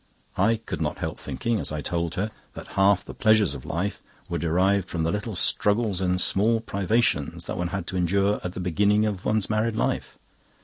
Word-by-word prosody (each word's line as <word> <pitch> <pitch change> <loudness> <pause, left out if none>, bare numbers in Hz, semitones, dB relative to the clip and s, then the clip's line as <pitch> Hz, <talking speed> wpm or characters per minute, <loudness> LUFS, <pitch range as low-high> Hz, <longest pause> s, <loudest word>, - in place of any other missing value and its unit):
I 110 +4 +4
could 115 0 -6
not - - -1
help - - -4
thinking 115 -2 -2
(as - - -3
I 75 -1 -3
told 85 +2 -2
her) 105 +3 -1 0.2
that - - -9
half 95 0 +3
the - - -8
pleasures 110 -3 +3
of - - -8
life 95 +5 -2 0.3
were 85 - -1
derived 90 +4 +2
from 80 -2 -2
the 80 - +1
little 105 +2 -3
struggles 105 +1 +2
and 90 -1 +1
small 110 +5 +2
privations 100 -7 0
that - - -4
one 90 - 0
had 95 -1 -4
to 95 - -4
endure 100 +4 +2
at 90 - -4
the - - -6
beginning 100 +4 +2
of 100 -3 -3
one's 110 -2 +1
married 110 +1 0
life. - - -1
100 Hz, 205 wpm, -25 LUFS, 90-105 Hz, 0.3 s, I